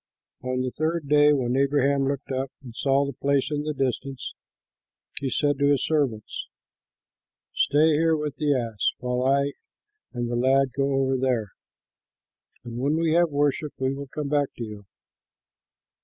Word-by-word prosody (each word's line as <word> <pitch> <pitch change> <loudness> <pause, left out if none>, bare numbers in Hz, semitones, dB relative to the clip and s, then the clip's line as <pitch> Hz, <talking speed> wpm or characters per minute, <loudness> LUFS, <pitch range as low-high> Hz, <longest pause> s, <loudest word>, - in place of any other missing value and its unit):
On 130 0 -2
the 130 0 -2
third 160 +1 -2
day, 150 0 +6
when 130 -4 +1
Abraham 140 0 +2
looked 140 0 -3
up 130 0 -2
and 120 -3 -11
saw 140 +1 +2
the 140 - -4
place 140 +2 0
in 145 -1 -1
the 155 +1 -2
distance, 135 0 -3 0.9
he 135 - -2
said 145 +1 +1
to 140 - +3
his 140 -2 +2
servants, 135 -9 -1 1.1
"Stay 150 +3 +3
here 160 +1 +3
with 150 -2 -3
the 150 -1 +1
ass, 115 -4 0
while 125 0 -2
I 140 +2 +2 0.6
and 120 -1 -3
the 120 - -2
lad 130 +1 +3
go 140 0 +1
over 135 -1 +1
there. 125 -5 0 1.1
When 125 +5 -1
we 165 -1 +1
have 170 0 +4
worshipped, 145 0 0
we 130 0 0
will 140 0 -6
come 145 +1 -4
back 145 -1 +2
to 120 - -5
you." 105 -2 -8
140 Hz, 160 wpm, -25 LUFS, 130-145 Hz, 1.1 s, day